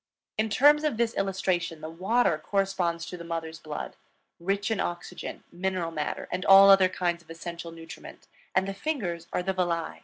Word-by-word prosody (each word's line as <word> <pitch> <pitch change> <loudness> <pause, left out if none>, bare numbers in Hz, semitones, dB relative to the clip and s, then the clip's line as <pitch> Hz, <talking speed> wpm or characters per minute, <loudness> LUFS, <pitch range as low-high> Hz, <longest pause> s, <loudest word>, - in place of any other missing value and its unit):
In 220 +1 0
terms 295 +7 +5
of 300 -8 0
this 235 -1 +1
illustration, 185 -4 -1
the - - -5
water 185 0 +1
corresponds 185 -2 -1
to 180 - -7
the 170 - -8
mother's 165 -1 -5
blood, 155 -2 -6 0.4
rich 200 +5 -1
in 220 - 0
oxygen, 175 0 -5
mineral 180 -1 -2
matter, 150 -2 -3
and 180 0 -2
all 195 0 +9
other 190 -1 +6
kinds 175 -2 -1
of 170 - -26
essential 170 0 -7
nutriment; 165 0 -11 0.3
and 190 +1 +3
the 195 - -3
fingers 195 - -3
are 180 - -1
the 190 +1 0
villi. 175 -3 -1
180 Hz, 180 wpm, -27 LUFS, 170-195 Hz, 0.4 s, all